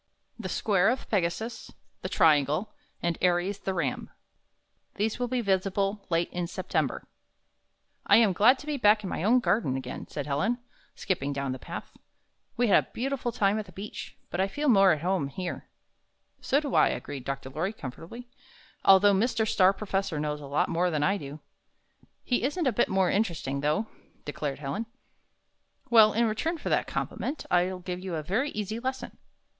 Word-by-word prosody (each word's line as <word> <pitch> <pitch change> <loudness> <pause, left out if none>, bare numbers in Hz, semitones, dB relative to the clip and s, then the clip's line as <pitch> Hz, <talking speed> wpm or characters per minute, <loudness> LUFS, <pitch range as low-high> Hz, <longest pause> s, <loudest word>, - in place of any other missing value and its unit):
THE 190 -5 -5
SQUARE 195 +1 +2
OF 255 +2 -2
PEGASUS, 220 +4 -2 0.3
THE - - -4
TRIANGLE, 155 - +3 0.3
AND 170 -1 -1
ARIES, 180 +3 +1
THE 190 -1 -3
RAM 150 -7 -2 0.9
These 215 +3 -1
will 245 - 0
he 250 0 -1
visible 195 0 0
late 170 0 0
in 175 -1 -2
September 185 - -2 1.0
"1 - - +7
am 220 -4 +4
glad 235 +9 +5
to 290 - -11
be 300 -1 -2
back 210 -3 +4
in 190 - -4
my - - -3
own 235 +5 +5
garden 170 - +1
again," 130 -1 -6
said 145 - -5
Helen, 150 +12 0 0.4
skipping 145 -7 -2
down 140 -1 -2
the 130 - -5
path. - - -8 0.6
''We 245 0 +3
had 200 - +5
a - - -28
beautiful 255 0 -2
time 205 -1 +1
at 210 - -6
the - - -13
beach, 195 +4 -8
but 175 - 0
I 190 - +2
feel 290 +8 -1
more 195 -5 +6
at 155 - 0
home 180 -5 0
here." 175 +6 -6 0.7
''So 280 - +2
do 290 -3 -4
I," - - +5
agreed 140 -3 -4
Dr. 135 0 -5
Lorry, 165 +8 -2
comfortably, 220 - -9 0.6
"although 195 +1 +7
Mr. 225 +2 +1
Star 190 -2 +5
Professor 195 -5 -2
knows 150 0 -2
a 140 - -8
lot 145 - +1
more 175 +2 +1
than 155 -3 0
I 195 +5 +2
do." 145 -3 -8 0.8
"He 245 - 0
isn't 295 +6 -1
a 260 - +3
bit 240 - +2
more 190 -1 +2
interesting, 165 -10 -1
though," 150 +9 +1 0.4
declared 145 -1 -3
Helen. 150 +11 -4 1.0
"Well, 220 -2 +8
in 235 +3 +2
return 265 +10 -1
for - - -5
that - - +1
compliment, 290 +4 -4
I'll 180 +1 +2
give 180 0 -5
you 185 -2 -4
a 155 - -3
yery 220 - 0
easy 215 +2 -3
lesson. 260 +2 -5
195 Hz, 180 wpm, -28 LUFS, 165-225 Hz, 1.0 s, Well